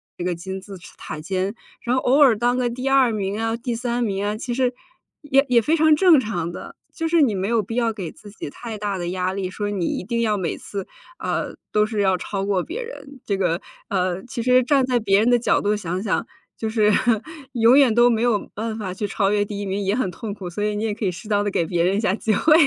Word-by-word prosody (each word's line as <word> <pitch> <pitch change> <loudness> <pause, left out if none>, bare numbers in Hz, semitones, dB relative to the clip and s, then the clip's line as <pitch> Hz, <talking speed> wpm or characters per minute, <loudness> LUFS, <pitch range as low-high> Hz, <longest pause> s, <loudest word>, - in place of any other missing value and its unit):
这 175 - -5
个 180 -1 -1
金 190 +2 -6
字 195 0 -10 0.2
塔 155 - -7
尖， 190 +5 -2 0.3
然 250 +1 0
后 - - -1
偶 275 +4 +4
尔 245 -7 +6
当 240 +2 +2
个 250 -1 0
第 255 +3 -4
2 270 -3 +4
名 205 0 -2
啊， 225 +1 -1
第 240 0 -3
3 240 +1 -1
名 200 -3 -1
啊， 210 +1 -1
其 245 +1 -4
实， 250 0 0 0.5
也 275 -1 +4
也 240 -1 +5
非 305 +8 +2
常 315 -1 +5
正 345 -4 +6
常 175 -8 -3
的， - - -9 0.2
就 325 -2 -2
是 325 -2 +4
你 225 -6 +2
没 190 +1 -1
有 230 -2 +2
必 225 - -7
要 235 -1 +1
给 190 -7 -6
自 205 - -14
己 200 -8 -8
太 225 +4 -7
大 205 -2 -3
的 175 - -3
压 185 +1 -1
力， 190 -2 -3
说 205 +1 -3
你 185 -4 -1
一 - - -2
定 235 +4 -1
要 215 -2 +1
每 175 -4 -2
次， 195 -2 -6 0.3
呃， - - -3 0.2
都 210 0 +3
是 215 -2 -3
要 190 -2 +3
超 195 +2 -3
过 195 -3 +1
别 455 +10 -5
人。 285 - -10
这 200 -2 0
个， 175 -2 +1 0.3
呃， 185 -1 0
其 245 -1 -4
实 255 +1 +5
站 270 +1 +3
在 250 -2 +1
别 195 -2 +3
人 225 +4 +3
的 245 - +5
角 235 - +2
度 210 +1 +1
想 185 -2 -3
想， 210 - -1 0.3
就 220 - -3
是， 215 -2 +3 0.6
永 235 +1 +5
远 270 -5 +5
都 240 +2 +5
没 225 -1 +1
有 230 -5 +1
办 220 +1 -4
法 190 -4 -4
去 205 +2 -3
超 195 0 +1
越 205 -1 +2
第 205 0 -6
1 205 - -3
名 195 +1 -2
也 195 +3 +1
很 245 -8 0
痛 205 +3 -6
苦， 190 -3 -7
所 205 +4 -4
以 210 0 0
你 210 - -2
也 220 - 0
可 215 - -7
以 185 - +1
适 185 +5 -10
当 205 -1 +2
地 205 - 0
给 170 - +1
别 170 0 0
人 190 +3 +2
一 - - +1
下， 210 -4 +1
机 220 0 0
会。 305 - +4
210 Hz, 280 characters per minute, -22 LUFS, 195-240 Hz, 0.6 s, 尔